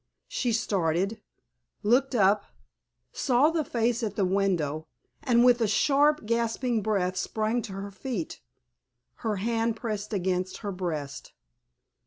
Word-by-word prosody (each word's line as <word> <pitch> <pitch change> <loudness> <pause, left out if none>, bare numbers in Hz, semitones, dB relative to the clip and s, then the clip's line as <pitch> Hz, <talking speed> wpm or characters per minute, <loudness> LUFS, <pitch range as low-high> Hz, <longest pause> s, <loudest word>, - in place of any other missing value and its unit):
She 245 - -1
started, 195 -2 0 0.6
looked 250 +5 +3
up, 200 -1 +4 0.7
saw 270 +4 +3
the 325 -1 0
face 235 -2 0
at 210 -3 -2
the 200 - +1
window, 175 -6 0 0.3
and 245 -4 +4
with 245 -1 +5
a 225 - +3
sharp, 285 +6 +3
gasping 230 +1 0
breath 195 -3 0
sprang 220 +5 -1
to 215 -4 -7
her 195 +1 -6
feet, 200 -3 -5 0.8
her 220 -3 -2
hand 225 +3 0
pressed 215 -2 -4
against 185 -2 -1
her 200 - -1
breast. 155 -7 -5
215 Hz, 130 wpm, -27 LUFS, 190-240 Hz, 0.8 s, with